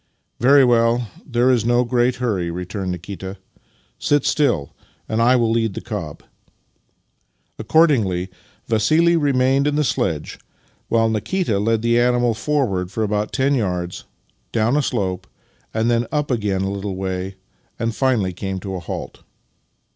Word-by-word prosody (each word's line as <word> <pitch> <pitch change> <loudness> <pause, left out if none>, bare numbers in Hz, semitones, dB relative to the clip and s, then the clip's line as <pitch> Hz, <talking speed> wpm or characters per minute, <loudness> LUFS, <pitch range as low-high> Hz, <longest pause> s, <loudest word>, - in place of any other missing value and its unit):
"Very 135 +2 +6
well; 115 -2 +2 0.2
tlicre 125 +1 +3
is 120 -4 +1
no 120 +1 +3
great 125 +1 +1
hurry," 105 -9 -1
returned 90 +2 -4
Nikita. 95 +2 -7 0.3
" - - -37 0.2
Sit 145 -2 +1
still, 110 - +1 0.3
and 110 +1 0
I 125 +2 +5
wih 120 -2 +3
lead 115 -3 0
the - - -3
cob." 95 -10 -6 1.4
Accordingly 105 - +2 0.3
Vassili 155 +10 +3
remained 135 -2 +2
in 145 - 0
the 150 - +2
sledge, 80 - -2 0.5
while 115 -1 +3
Nikita 110 - -1
led 110 +1 +1
+he 120 0 +3
animal 120 -1 +2
forward 110 -8 -1
for 110 +3 -2
about 105 0 -1
ten 135 +1 +1
yards, 90 -8 -2 0.5
down 115 +4 +1
a 150 - +3
slope, 95 -8 -2 0.4
then 115 +1 +1
up 150 -2 -1
again 105 -5 0
a 95 - -1
little 100 -1 -4
way, 95 0 -4 0.4
and 115 0 -1
finally 120 -9 +1
came 95 +1 -4
to 95 0 -5
a 95 - -3
halt. 85 - -7
115 Hz, 145 wpm, -21 LUFS, 95-125 Hz, 1.4 s, Very